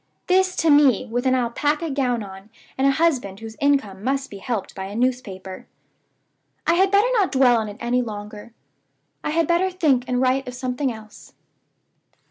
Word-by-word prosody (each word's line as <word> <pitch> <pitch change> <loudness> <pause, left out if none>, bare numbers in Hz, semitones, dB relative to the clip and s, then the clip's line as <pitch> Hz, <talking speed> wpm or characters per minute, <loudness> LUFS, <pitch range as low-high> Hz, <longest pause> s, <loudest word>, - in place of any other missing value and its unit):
This 370 0 +2
to 325 -2 +2
me, 280 -6 +5
with 245 +2 -2
an 260 - +3
alpaca 290 +6 -1
gown 250 -5 0
on, 195 +1 -11 0.3
and 265 +1 +2
a - - +5
husband 265 -11 0
whose 225 -1 -9
income 275 -9 +1
must 270 +2 -1
be 200 - -8
helped 215 0 -4
by 190 - -6
a 200 +2 -7
newspaper! 215 -7 -3 1.0
"I - - +3
had 380 +3 +3
better 405 +2 +4
not 390 - +1
dwell 260 -3 +4
on 220 -2 -2
it 205 - -10
any 245 +1 0
longer. 210 -1 -8 0.7
I - - -2
had 330 +2 +1
better 345 +4 +2
think 300 -9 +1
and 250 -1 0
write 260 +1 +1
of 250 - -6
something 255 +2 -2
else. 215 -2 -13
250 Hz, 180 wpm, -22 LUFS, 220-290 Hz, 1.0 s, me